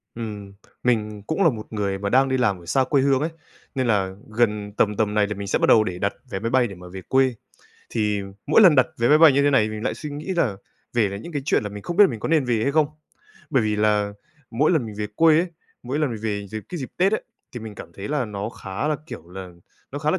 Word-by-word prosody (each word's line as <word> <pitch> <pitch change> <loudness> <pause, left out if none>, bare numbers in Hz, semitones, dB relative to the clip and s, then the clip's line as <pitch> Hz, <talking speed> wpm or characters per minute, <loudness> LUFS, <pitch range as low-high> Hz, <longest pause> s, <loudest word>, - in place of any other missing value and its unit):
Ừm, 105 -4 -6 0.3
mình 105 -4 0
cũng 195 +5 +1
là 165 - +6
một 110 -4 -6
người 100 -2 -1
mà 100 0 -2
đang 135 +3 +4
đi 130 - +1
làm 100 -8 +1
ở 85 - -15
xa 130 +9 +2
quê 140 +1 +2
hương 135 -1 +3
ấy, 155 - 0 0.5
nên 130 -2 0
là 95 -4 +1
gần 105 -2 0
tầm 105 -1 +2
tầm 105 -2 +1
này 105 -1 +3
thì 105 - -3
mình 100 0 -6
sẽ - - +1
bắt - - +2
đầu 110 - +7
để 90 -4 -4
đặt - - 0 0.2
vé 95 - -3
máy 115 +3 -2
bay 125 0 +3
để 100 - -9
mà 90 0 -12
về 95 +1 -8
quê. 130 +4 +2 0.6
Thì 105 -2 0 0.2
mỗi - - +5
lần 180 -6 +8
đặt 130 -3 +5
vé 120 +1 +2
máy 150 - +6
bay 160 -2 +8
như 140 +1 +3
thế 145 - +4
này 135 -5 +4
thì 110 - -3
mình 110 0 -6
lại - - 0
suy 150 - -7
nghĩ 150 +6 -4
là 120 - +1 0.4
về 115 -4 +2
là 100 - -5
những 140 +12 -9
cái 145 -2 -2
chuyện - - +2
là 105 - -3
mình 105 0 -9
không 175 - -5
biết 205 - +9
là - - +3
mình 115 -4 -6
có - - -3
nên 160 -3 +3
về 120 -3 +1
hay 140 - +1
không, 155 0 +4 0.6
bởi 130 - +3
vì 105 -1 0
là 105 -1 +2 0.4
mỗi 125 +7 +2
lần 155 -9 +1
mình 110 - -8
về 105 - -1
quê 160 -1 +6
ấy, 175 - +1 0.4
mỗi 130 +4 -3
lần 150 -4 +1
mình 110 -2 -5
về 100 -2 -2
dịp 110 +2 -6
cái 175 - -5
dịp 130 - -5
Tết 190 +3 +3
ấy, - - 0 0.3
thì 120 - -6
mình 110 -1 -8
cảm 85 - -10
thấy 95 +4 -7
là 145 -3 0
nó 105 -1 -4
khá 105 +4 -4
là, 155 - +1
kiểu 85 - -9
là, 95 0 -8 0.4
nó 145 - -3
khá 150 +1 0
là 185 - +1
115 Hz, 290 wpm, -23 LUFS, 105-140 Hz, 0.6 s, biết